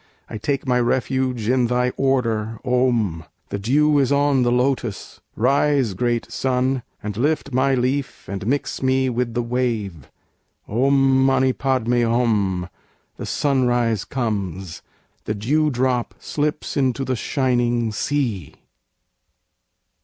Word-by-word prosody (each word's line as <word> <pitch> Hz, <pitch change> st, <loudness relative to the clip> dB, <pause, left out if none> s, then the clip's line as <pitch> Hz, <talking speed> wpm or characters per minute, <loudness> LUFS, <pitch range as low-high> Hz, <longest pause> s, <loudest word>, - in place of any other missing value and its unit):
I 110 Hz, -, -7 dB
take 140 Hz, +5 st, -2 dB
my 125 Hz, -1 st, +3 dB
refuge 125 Hz, -1 st, 0 dB
in 125 Hz, 0 st, +3 dB
Thy 125 Hz, +1 st, +1 dB
Order! 115 Hz, -5 st, 0 dB
Om! 120 Hz, -10 st, +1 dB, 0.3 s
The 100 Hz, -, -3 dB
Dew 145 Hz, +7 st, +3 dB
is 135 Hz, -1 st, +2 dB
on 140 Hz, -1 st, +3 dB
the 120 Hz, -1 st, +2 dB
lotus 125 Hz, -4 st, -1 dB
rise, 135 Hz, -1 st, +2 dB
great 120 Hz, +4 st, -1 dB
Sun! 130 Hz, 0 st, 0 dB, 0.2 s
And 105 Hz, -1 st, -4 dB
lift 140 Hz, +3 st, -1 dB
my 135 Hz, +1 st, +2 dB
leaf 130 Hz, +2 st, -2 dB
and 100 Hz, +2 st, -5 dB
mix 140 Hz, +3 st, -1 dB
me 130 Hz, 0 st, +2 dB
with 120 Hz, -1 st, -2 dB
the 120 Hz, -, 0 dB
wave. 115 Hz, -, -2 dB, 0.6 s
Om 135 Hz, +3 st, +3 dB
mani 130 Hz, -1 st, +3 dB
padme 125 Hz, -3 st, 0 dB
hum, 110 Hz, -6 st, +1 dB, 0.5 s
the -, -, -6 dB
Sunrise 120 Hz, -6 st, +1 dB
comes! 95 Hz, -8 st, -3 dB, 0.4 s
The 105 Hz, -, -2 dB
Dewdrop 130 Hz, +1 st, 0 dB
slips 150 Hz, 0 st, -2 dB
into 135 Hz, -2 st, 0 dB
the 130 Hz, -, -1 dB
Shining 120 Hz, -3 st, 0 dB
Sea! 115 Hz, -, -2 dB
125 Hz, 125 wpm, -21 LUFS, 115-135 Hz, 0.6 s, my